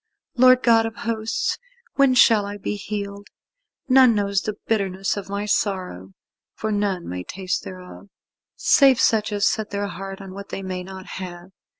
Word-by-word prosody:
Lord 255 0 +6
God 225 -1 +4
of 225 - -8
Hosts, 225 -1 -1 0.3
when 275 -2 +4
shall 225 -4 +6
I 205 0 -6
be 205 - -3
healed? 200 0 -6 0.6
None 255 -3 +6
knows 200 -1 0
the 215 - -4
bitterness 195 -3 -1
of 200 -1 -7
my 200 +1 -3
sorrow, 185 - -2 0.4
for 220 - -3
none 200 -4 -1
may 90 0 -5
taste 185 - -3
thereof, 185 +1 -10 0.5
save 270 -3 +5
such 220 -3 +2
as 205 0 +1
set 215 -2 0
their 200 0 -2
heart 195 -1 -7
on 195 -1 -9
what 200 +1 -9
they 195 - -5
may 185 -1 -4
not 190 0 -9
have. 180 -1 -8
200 Hz, 170 wpm, -22 LUFS, 190-220 Hz, 0.6 s, Lord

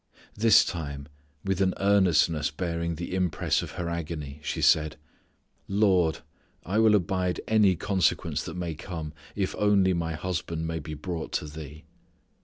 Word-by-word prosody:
This 110 +2 +5
time 70 -5 -5 0.4
with 95 -1 0
an 95 -1 +2
earnestness 90 -6 +3
bearing 85 +1 -3
the 85 +3 -5
impress 90 -2 +1
of - - -7
her 90 - -4
agony 80 -4 -5
she - - -3
said, 75 -1 +3 0.7
"Lord, 95 -5 +2 0.4
I 100 +5 0
will 110 -1 +6
abide 90 -1 0
any 105 -4 +4
consequence 95 +1 0
that 80 - -6
may 85 -2 -3
come 80 -1 -6 0.2
if 95 -2 -1
only 100 -3 +4
my 85 -1 -2
husband 80 0 -3
may 80 0 -3
be 75 +1 -7
brought 80 +1 -5
to - - -1
Thee." 75 0 -9
85 Hz, 150 wpm, -27 LUFS, 80-95 Hz, 0.7 s, will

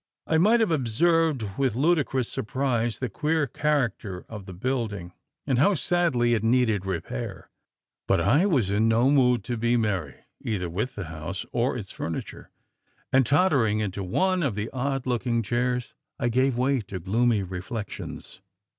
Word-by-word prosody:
I 160 - +2
might 220 +7 +5
have 220 - +2
observed 155 0 +2
with 130 -5 +1
ludicrous 135 -4 +1
surprise 120 -2 -1
the 130 - -2
queer 150 +7 0
character 120 -9 -1
of 105 -3 -9
the 95 - -7
building, 105 -4 -3 0.3
and 130 -3 +1
how 195 +8 +4
sadly 140 -12 +1
it 110 -2 0
needed 115 -5 +2
repair. 85 -9 -5 0.6
But 95 - +3
I 145 - +3
was 125 - +1
in 105 +3 +2
no 115 +4 +3
mood 125 -4 +3
to 120 -1 -3
be 120 +2 +2
merry, 95 -10 -1 0.3
either 90 -6 -2
with 105 +9 -3
the 100 - -4
house 80 +4 -6
or 125 +2 0
its 100 -5 -7
furniture; 80 - -6 0.6
and, 130 -2 +4
tottering 140 - +3
into 100 -2 -3
one 185 - +1
of 140 -10 0
the 105 +1 -3
odd 135 0 -2
looking 120 -2 0
chairs, 125 +3 -1 0.2
I 120 - 0
gave 130 +1 +2
way 130 0 +2
to 95 -2 -7
gloomy 110 +4 +1
reflections. 95 +4 -7
120 Hz, 160 wpm, -26 LUFS, 105-135 Hz, 0.6 s, might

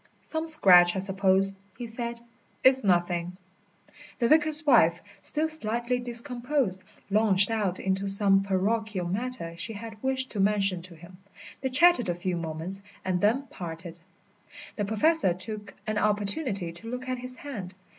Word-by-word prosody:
"Some 320 0 -5
scratch, 180 - +5
I - - -2
suppose," 195 0 +1 0.2
he 240 - -6
said. 235 +1 -6 0.4
"It's 260 -1 +7
nothing." 175 -1 -1 0.8
The 235 - +1
vicar's 310 +2 +4
wife, 170 - +4 0.2
still 305 +10 -1
slightly 240 -4 -2
discomposed, 240 -3 -2 0.3
launched 200 -1 +5
out 205 -5 -2
into 190 +1 -2
some 195 0 +4
parochial 195 0 -2
matter 205 -2 -4
she 225 +6 -5
had 220 0 -10
wished 265 0 -1
to 210 - -5
mention 195 -2 +1
to 175 0 -10
him. 175 +3 -16 0.4
They 265 - -2
chatted 260 - +4
a 175 - -1
few 180 +1 -3
moments 165 +3 -5 0.2
and 180 -1 -1
then 230 +7 +1
parted. 170 0 -8 0.8
The 205 - -2
Professor 220 - +1
took 205 +2 +2
an 215 -1 -2
opportunity 205 - 0
to 175 +7 -10
look 250 +1 -6
at 255 -1 -3
his 250 0 -8
hand. 205 -11 -8
205 Hz, 150 wpm, -26 LUFS, 185-245 Hz, 0.8 s, It's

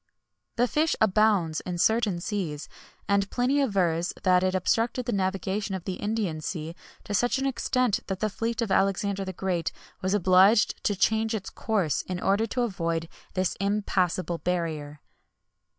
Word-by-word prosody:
[XXI - - -52
110] 240 - +3
This 245 - 0 0.2
fish - - +1
abounds 205 -6 +3
in 180 -1 -5
certain 215 -1 +2
seas, 170 -6 -3 0.4
and 200 0 +2
Pliny 260 +4 +1
avers 180 -8 +1
that 180 -1 +4
it 185 0 +1
obstructed 230 +6 0
the 245 - -1
navigation 195 +1 -1
of 185 - -6
the 190 - -3
Indian 205 -7 -2
Sea 160 0 -5 0.3
to 205 - -5
such 245 +6 +2
an 270 - -1
extent, 255 -4 +1
that 190 -2 -3
the 215 - +1
fleet 230 +3 -2
of 215 - -3
Alexander 195 +1 +1
the 190 - -4
Great 185 -2 -2 0.3
was 190 +2 +1
obliged 190 +3 +4
to 205 - +2
change 220 +3 +1
its 200 -3 -5
course, 200 -10 0
in 180 -1 -3
order 200 +5 +1
to 245 +3 -1
avoid 165 -6 -2 0.3
this 185 -1 0
impassable 185 -4 0
barrier. 155 -5 -3
195 Hz, 165 wpm, -27 LUFS, 180-220 Hz, 0.4 s, that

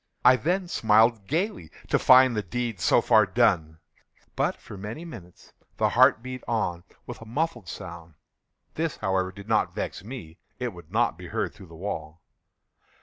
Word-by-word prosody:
I 125 +1 +8
then 180 +7 -1
smiled 110 - +3
gaily, 160 - -2 0.2
to - - +3
find 130 -1 +6
the 105 - 0
deed 115 +2 -4
so - - +4
far 110 -2 +4
done. 90 -7 +2 0.6
But, - - 0
for - - -12
many 105 - -7
minutes, 90 - -12 0.2
the - - +2
heart 115 - +4
beat 130 0 -7
on 90 -7 -1 0.2
with - - -8
a - - -9
muffled 145 - -2
sound. 85 -2 -9 0.6
This, 160 -1 -2
however, 95 -2 0
did 100 +2 -12
not 110 -1 +1
vex - - -4
me; 105 -8 -9 0.2
it 125 -1 -2
would 85 -2 -14
not 115 -5 +1
be 90 - -8
heard - - -2
through 95 - -14
the 85 - -13
wall. 80 -3 -6
110 Hz, 170 wpm, -26 LUFS, 90-125 Hz, 0.6 s, I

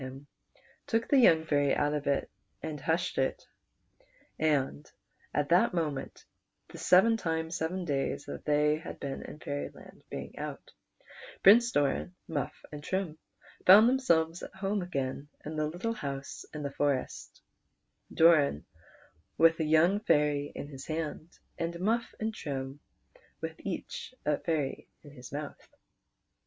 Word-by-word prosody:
him, 130 +2 -8 0.3
he - - -28 0.3
took 225 0 0
the 280 - +6
young 160 -10 +6
fairy 145 -3 +2
out 145 0 +1
of 150 -1 -3
it 140 -1 +1 0.4
and 155 -3 -5
hushed 160 +4 0
it; - - -1 0.9
and 140 - 0 0.4
at 145 -1 0
that 175 +1 +4
moment 150 -5 -3 0.4
the - - -10
seven 195 +6 +5
times 160 -4 -2
seven 180 +2 -2
dax'S 140 -1 -1
that - - -7
they 150 +1 +2
liad - - -7
been 140 -1 -4
in - - -9
Fairyland 145 -1 -7
being - - -7
out, - - -6 0.7
Prince 235 +5 +8
Doran, 145 - 0
Muff, 145 -3 -4
and 145 -1 -8
Trim 180 -3 -2 0.5
found 205 +5 +10
themselves 170 -11 +2
at - - -9
home 195 +1 -1
again 140 -5 -3 0.2
in 155 +1 -5
the 155 0 0
little 180 +9 -3
house 140 -7 -6
in 150 -1 -6
the 140 - -3
forest; 140 -2 -2 0.7
Doran 155 - +4 0.7
with 165 0 +5
a - - +2
young 165 +6 +4
fairy 150 -6 +2
in - - -5
his 135 -2 -10
hand, 160 +1 -4 0.2
and 170 +1 -3
Muff 225 +5 0
and 220 0 -2
Trim 135 -5 -5 0.6
with - - -4
each 255 - -6
a 150 -1 +1
fairy 150 -5 -2 0.2
in 145 - -13
his 125 -3 -12
mouth. 145 +1 -6
155 Hz, 145 wpm, -30 LUFS, 145-180 Hz, 0.9 s, found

